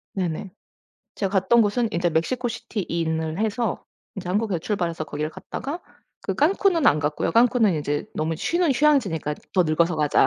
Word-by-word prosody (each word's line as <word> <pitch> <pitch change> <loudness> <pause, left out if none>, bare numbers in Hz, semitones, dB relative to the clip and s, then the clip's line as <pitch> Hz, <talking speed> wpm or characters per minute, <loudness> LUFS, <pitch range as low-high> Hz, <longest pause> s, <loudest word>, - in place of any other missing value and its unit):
네네. 185 +1 -3 0.6
제가 195 -2 -2
갔던 230 +5 +4
곳은 225 +3 +1
인제 175 0 +1
멕시코 240 +10 0
시티 225 -3 -5
in을 160 0 -1
해서 220 +2 -1 0.3
이제 180 -2 -6
한국에 200 -2 0
출발해서 170 -4 -2
거기를 150 +1 -4
갔다가 285 - -6 0.4
그 - - -2
깐쿤은 340 +1 +3
안 150 - +5
갔고요. 150 0 -1
'깐쿤은 230 -7 +4
이제 145 0 -2
너무 160 +1 -1
쉬는 340 - +1
휴양지니까 235 - +2 0.2
더 185 - +4
늙어서 165 +2 +2
가자.' 150 -3 +3
190 Hz, 370 characters per minute, -24 LUFS, 160-235 Hz, 0.6 s, 안